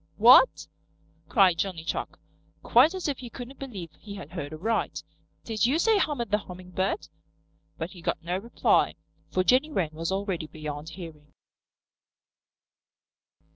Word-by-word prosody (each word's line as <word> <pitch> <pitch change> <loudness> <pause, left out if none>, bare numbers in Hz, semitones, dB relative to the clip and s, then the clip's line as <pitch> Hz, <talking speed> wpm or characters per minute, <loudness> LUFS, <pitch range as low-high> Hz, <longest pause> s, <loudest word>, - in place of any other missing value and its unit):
"What?" - - +7 0.6
cried 185 -7 +4
Johnny 180 -5 -2
Chuck, - - -4 0.5
quite 275 +10 +5
as 370 - -3
if 285 -3 -2
he 250 -2 -8
couldn't 250 +3 -9
believe 200 - -7
he 205 -2 -9
had 175 -6 -9
heard 160 -5 -5
aright. 215 +9 -2 0.4
"Did 225 0 +1
you 275 +5 +2
say 430 +4 +3
Hummer 290 -9 0
the 210 -1 +1
Hummingbird?" 185 - -4 0.7
But 165 +3 -4
he 180 - -12
got 165 - -2
no 175 +2 -1
reply, 230 +4 +2 0.3
for 185 - +1
Jenny 260 +9 +4
Wren 180 - -1
was 165 +3 -3
already 190 -5 -2
beyond 150 0 -6
hearing. 160 -4 -11
190 Hz, 140 wpm, -27 LUFS, 165-245 Hz, 0.7 s, What